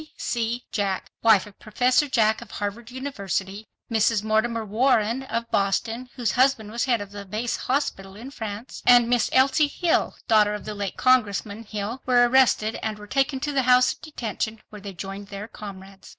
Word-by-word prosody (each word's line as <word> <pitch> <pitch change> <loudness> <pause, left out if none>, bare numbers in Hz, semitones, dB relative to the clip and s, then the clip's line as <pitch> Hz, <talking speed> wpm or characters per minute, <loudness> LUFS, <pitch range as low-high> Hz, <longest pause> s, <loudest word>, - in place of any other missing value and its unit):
C. 235 +1 -2
Jack, 200 -3 -2
wife 220 -3 +5
of 205 -2 -16
Professor 250 +6 +2
Jack 220 -3 +2
of 235 - -11
Harvard 210 +3 -5
University, 210 -6 -4 0.2
Mrs. 220 -1 +2
Mortimer 220 +1 0
Warren 230 +2 +2
of 230 -3 -4
Boston, 225 +5 -1
whose 240 -6 0
husband 250 -4 +2
was 235 +3 -1
head 240 -5 +1
of 200 0 -9
a 205 0 -7
base 215 +5 -3
hospital 195 -8 -2
in 240 +6 -9
France, 220 -2 -7
and 245 -1 +7
Miss 240 -2 +2
Elsie 275 +3 +4
Hill, 330 +3 0
daughter 210 -2 +4
of 210 - -8
the 215 - -4
late 200 -2 -4
Congressman 220 -3 +1
Hill, 215 +4 -5
were 245 -1 +5
arrested 240 -4 +3
and 215 -1 -3
were 210 - -11
taken 270 +4 0
to 295 0 -2
the 275 -1 +2
House 250 0 +5
of - - -22
Detention, 225 -6 -4
where 210 -1 -11
they 200 -1 -7
joined 195 +3 -7
their 200 +1 -7
comrades. 195 -3 -11
225 Hz, 180 wpm, -24 LUFS, 205-250 Hz, 0.2 s, and